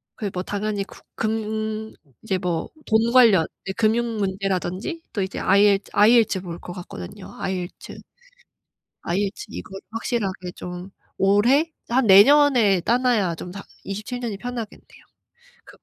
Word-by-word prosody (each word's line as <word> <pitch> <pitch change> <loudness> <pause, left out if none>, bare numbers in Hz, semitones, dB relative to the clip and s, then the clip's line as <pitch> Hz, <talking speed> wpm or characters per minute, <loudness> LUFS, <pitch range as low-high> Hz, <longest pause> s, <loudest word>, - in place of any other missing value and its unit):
그 205 -3 -4
뭐 180 - -2
당연히 205 0 -2
그 - - -15 0.2
금 220 0 -3 0.3
이제 195 -4 -1
뭐 175 -3 -2 0.2
돈 225 +1 +3
관련 225 -10 +6 0.2
이제 190 - -3
금융 230 +1 +1
문제라든지? 195 - -2
또 205 - -1
이제 190 +1 -4
IEL 200 +1 +5 0.2
IELTS 215 -2 +4
볼 170 -2 -7
것 175 - -8
같거든요. 135 - -9
IELTS, 185 -1 -5 1.0
IELTS 195 +4 -2
이거 - - -8 0.2
확실하게 200 -5 -3
좀 180 +1 -7 0.3
올해? 240 +12 +3 0.2
한 250 +2 +2
내년에 215 -1 +6
따 235 +7 +2
놔야 225 -9 +1
좀 175 +2 -8
다 195 +2 -8 0.2
27 210 +5 -5
년이 230 -5 -4
편하겠네요. 240 -1 -8 0.6
그 - - -16
마 - - -57
205 Hz, 290 characters per minute, -23 LUFS, 190-230 Hz, 1.0 s, 관련